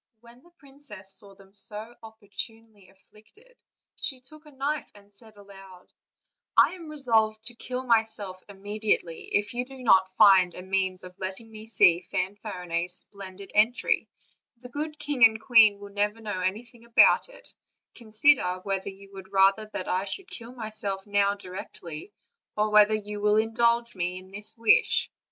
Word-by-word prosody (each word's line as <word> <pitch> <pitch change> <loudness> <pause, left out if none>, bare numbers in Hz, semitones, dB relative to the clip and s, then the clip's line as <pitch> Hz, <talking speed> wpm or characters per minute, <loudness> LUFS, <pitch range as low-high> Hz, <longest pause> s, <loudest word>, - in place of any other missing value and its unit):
When 235 +1 -17
the 345 - -22
princess 270 -9 -6
saw 200 -1 -4
them 195 0 -20
so 210 +2 -4
opportunely 220 -1 -10
afflicted 215 - -21 0.4
she 265 -3 -2
took 305 +4 -17
a - - -14
knife 280 +2 -3
and 205 0 -19
said 220 0 -12
aloud: 195 -2 -15 0.6
"I - - +6
am 340 -4 -10
resolved 225 -7 +1
to 240 - -1
kill 250 +2 -5
myself 220 -5 0
immediately, 205 -3 -2
if 205 +2 0
you 245 +1 -1
do 260 0 -12
not 190 -4 +5
find 190 -4 +6
a 180 - -8
means 190 -1 -1
of 180 0 -12
letting 190 +4 -6
me 220 0 -10
see 175 -6 +5
Fanfarinet's 180 -3 -3 0.2
splendid 195 -1 -10
entry; 220 +4 +2 0.5
the 250 +1 -12
good 300 +4 -5
king 290 -4 -1
and 220 -1 +7
queen 220 -3 +6
will 200 0 -11
never 210 +2 -1
know 210 -4 -4
anything 225 +6 -4
about 235 - +5
it; - - -4 0.4
consider 220 -4 +2
whether 195 0 -2
you 195 0 -14
would 190 0 -11
rather 195 +2 +3
that 185 -3 -6
I 185 +2 0
should 365 - -6
kill 235 0 -8
myself 215 -4 -3
now 205 -1 +2
directly, 180 -3 -8 0.5
or 210 0 +1
whether 210 0 +6
you 210 -1 -6
will 210 0 +3
indulge 235 +1 +1
me 180 -1 -3
in 185 +1 -12
this 210 +3 -4
wish." 230 - +3
210 Hz, 160 wpm, -27 LUFS, 195-235 Hz, 0.6 s, and